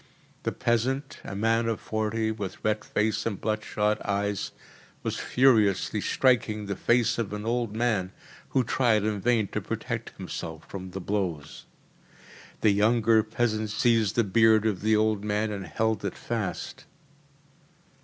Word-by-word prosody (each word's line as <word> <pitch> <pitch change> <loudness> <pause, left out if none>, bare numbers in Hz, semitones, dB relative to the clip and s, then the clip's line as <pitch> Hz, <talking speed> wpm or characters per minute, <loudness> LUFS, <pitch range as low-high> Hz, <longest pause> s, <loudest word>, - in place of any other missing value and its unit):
The - - -1
peasant 130 +4 -1
a 100 - -6
man 115 +2 +2
of 115 -2 -1
forty, 110 0 -1
with 100 -4 -6
red 110 0 +1
face 105 0 0
and 100 -4 -3
blood 110 0 -1
shot 105 0 0
eyes 100 -1 -1 0.5
was - - -2
furiously 110 -7 +3
striking 115 -5 +2
the 100 0 -3
face 120 +2 +2
of 110 -3 -2
an 105 +1 -5
old 115 -2 -1
man, 110 -6 0 0.4
who 130 - +2
tried 115 -3 +2
in 105 -2 -1
vain 115 -2 +2
to - - -3
protect - - -5
himself 80 -1 -6
from 95 -1 -7
the 95 +1 -6
blows. 90 -6 -3 0.9
The 110 - +5
younger 110 +2 +4
peasant 110 -1 -1
seized 110 0 +2
the 115 - +4
beard 110 +1 +4
of 105 -4 0
the 110 +1 +3
old 110 -1 +1
man 105 +1 0
and 100 -2 -5
held 110 -1 -1
it 100 - -3
fast. 100 -7 -4
110 Hz, 155 wpm, -27 LUFS, 100-115 Hz, 0.9 s, The